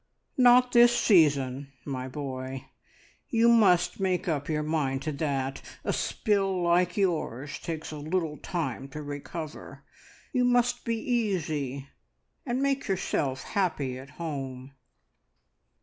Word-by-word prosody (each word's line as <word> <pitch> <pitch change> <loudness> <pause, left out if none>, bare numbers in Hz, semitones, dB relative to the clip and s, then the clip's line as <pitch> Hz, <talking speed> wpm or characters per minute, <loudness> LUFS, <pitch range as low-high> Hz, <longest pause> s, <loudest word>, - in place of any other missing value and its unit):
"Not 250 -2 +6
this 240 0 +6
season, 140 - +3
my 130 -2 -4
boy; 130 -1 -5 0.6
you 230 0 +3
must 190 -7 +4
make 185 -2 0
up 145 -3 -1
your 150 -1 0
mind 140 -4 -1
to 155 - -2
that. 140 -2 -2 0.2
A - - 0
spill 195 -4 0
like 175 +1 +2
yours 155 - -1
takes 160 -2 -5
a 155 - -6
little 155 0 -2
time 135 -7 -3
to 150 +2 -7
recover. 145 +2 -7 0.5
You 250 -2 +2
must 245 0 +2
be 230 -1 0
easy, 160 - -1 0.6
and 255 +2 0
make 275 -1 0
yourself 140 -8 -1
happy 150 - -1
at 135 +1 -11
home." 135 -5 -5
160 Hz, 125 wpm, -28 LUFS, 140-200 Hz, 0.6 s, Not